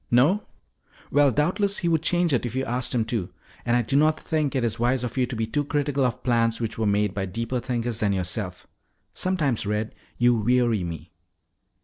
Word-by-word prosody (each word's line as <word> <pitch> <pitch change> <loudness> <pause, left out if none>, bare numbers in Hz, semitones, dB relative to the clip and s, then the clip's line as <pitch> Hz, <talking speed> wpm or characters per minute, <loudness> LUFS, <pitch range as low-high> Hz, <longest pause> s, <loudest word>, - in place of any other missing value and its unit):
"No? 145 - +4 0.7
Well, 145 0 +5
doubtless 195 - +1
he 175 - -1
would 165 -2 +2
change 175 -1 +2
it 125 - +1
if 120 0 -4
you 135 0 0
asked 125 +1 -1
him 115 -2 +1
to. 110 -6 -3 0.4
And 120 0 +3
I 120 - +1
do 135 +5 -2
not 155 +2 +3
think 155 -3 -1
it 130 - +1
is 115 0 -1
wise 125 +1 +1
of 120 -2 -4
you 130 -2 +1
to 125 - -5
be 110 0 -1
too 145 +6 -1
critical 145 -1 0
of 125 0 -1
plans 115 -2 +2
which 115 -2 -3
were 110 -1 0
made 105 -1 +1
by 95 -1 -2
deeper 115 +6 -3
thinkers 120 -2 -2
than 105 -2 +1
yourself. 90 0 -2 0.5
Sometimes, 150 - 0
Red, 105 +1 -2 0.2
you 120 0 +4
weary 120 -2 +2
me." 85 -2 -7
120 Hz, 210 wpm, -25 LUFS, 110-145 Hz, 0.7 s, Well